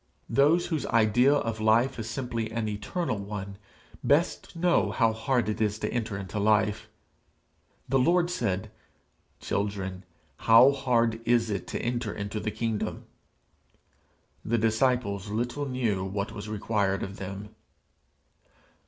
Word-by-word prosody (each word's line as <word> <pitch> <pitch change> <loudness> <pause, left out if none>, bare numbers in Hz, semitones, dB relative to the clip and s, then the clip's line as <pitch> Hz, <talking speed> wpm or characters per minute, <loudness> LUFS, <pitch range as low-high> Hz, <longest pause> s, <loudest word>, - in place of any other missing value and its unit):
Those 150 +5 +4
whose 155 - -1
idea 115 +4 +4
of 115 -5 -2
life 115 +4 +3
is 110 0 -4
simply 115 -2 -3
an 110 -1 -2
eternal 105 - -3
one, 100 -1 -6 0.4
best 160 +5 +1
know 175 +1 +2
how 115 -3 +2
hard 115 +2 0
it 110 +1 -2
is 105 -1 +1
to - - -3
enter 115 -4 -2
into 95 +1 -5
life. 105 0 +2 1.0
The 135 +1 +2
Lord 175 +6 +3
said, 105 - -2 0.7
'Children 95 -2 -3 0.3
how 115 +4 +7
hard 115 -4 +1
is 115 -1 +2
it 100 - -3
to - - -4
enter 120 -3 -1
into 105 +1 -4
the 105 +1 -2
kingdom!' 110 0 -3 1.4
the 115 +2 0
disciples 110 -3 +1
little 120 +7 -2
knew 115 -7 0
what 100 +1 -3
was 105 +1 -7
required 100 -2 0
of 95 0 -6
them! 100 +2 -7
110 Hz, 135 wpm, -27 LUFS, 105-125 Hz, 1.4 s, how